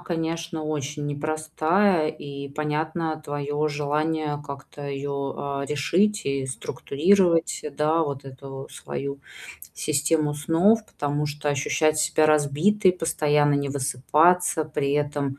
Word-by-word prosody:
конечно, 165 -1 -3
очень 150 -1 -3
непростая, 155 +4 +1
и 140 -2 -7
понятно 155 +2 -2
твое 145 +1 -2
желание 150 +1 -1
как-то 140 +1 -9
её, 140 0 -3
а, 140 0 -3
решить 180 +9 +1
и 140 -1 -1
структурировать, 165 +6 +1
да, 155 +2 +2
вот 140 -2 -5
эту 135 0 -9
свою 140 0 -5 0.6
систему 150 0 +1
снов. 180 +9 +3
Потому 145 +1 -2
что 150 0 -4
ощущать 155 +2 +1
себя 155 0 +3
разбитой, 155 +7 +3
постоянно 150 -4 +2
не 140 0 0
высыпаться, 155 +5 +2
при 150 -2 -1
этом, 145 -1 -1
150 Hz, 115 wpm, -25 LUFS, 140-160 Hz, 0.6 s, снов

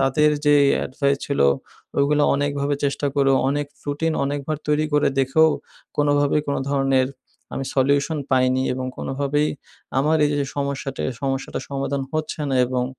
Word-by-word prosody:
তাদের 150 +3 +3 0.2
যে 145 - +6 0.3
advice 140 +1 0
ছিল, 140 - -1 0.6
ওইগুলো 145 +1 +3
অনেকভাবে 145 0 0
চেষ্টা 140 +1 0
করেও, 135 -1 +3
অনেক 145 +1 -1 0.2
রুটিন 155 +3 0
অনেকবার 145 +2 -2
তৈরি 150 +1 +2
করে 150 0 +3
দেখেও, 145 +4 +4 0.5
কোনোভাবে 145 0 +2
কোনো 140 - -1
ধরনের 135 -2 +2 0.5
আমি 135 - -3
সলিউশন 140 +3 +2
পাইনি 130 0 +3
এবং 130 0 -3
কোনোভাবেই 145 +2 0 0.5
আমার 155 +3 +3
এইযে 145 -1 0
সমস্যাটা, 140 -1 -3 0.2
সমস্যাটার 135 0 -2
সমাধান 140 0 -2
হচ্ছে 155 0 -3
না 135 - 0
এবং 125 0 -1
140 Hz, 140 wpm, -22 LUFS, 135-145 Hz, 0.6 s, যে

